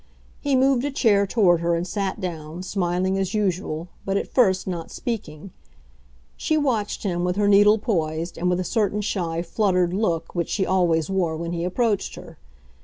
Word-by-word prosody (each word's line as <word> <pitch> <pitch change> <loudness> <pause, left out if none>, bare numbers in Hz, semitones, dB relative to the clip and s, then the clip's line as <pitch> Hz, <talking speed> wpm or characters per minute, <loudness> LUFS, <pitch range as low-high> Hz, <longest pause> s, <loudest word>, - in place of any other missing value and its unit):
He 285 -2 0
moved 260 -1 +3
a 285 - 0
chair 210 -7 +3
toward 190 -5 +3
her 170 0 +1
and 170 +1 -2
sat 195 +1 -3
down, 170 -2 -5
smiling 185 0 0
as 190 +1 -2
usual, 180 -5 -1 0.2
but, 195 0 0
at - - -4
first, 190 -7 +3
not 175 -3 -4
speaking. 195 -7 -5 0.8
She 315 - 0
watched 240 -10 -1
him, 175 -4 -1
with 180 0 0
her 205 0 +2
needle 205 +1 +6
poised, 170 -6 -2
and 180 +2 -1
with 180 0 +1
a - - 0
certain 210 0 0
shy, 170 -5 -2
fluttered 180 -2 +1
look 170 -5 -1
which 170 -2 -2
she 190 - 0
always 175 -3 +1
wore 175 -4 0
when 170 +1 -4
he 170 0 -2
approached 205 +3 0
her. - - -12
185 Hz, 180 wpm, -23 LUFS, 170-210 Hz, 0.8 s, needle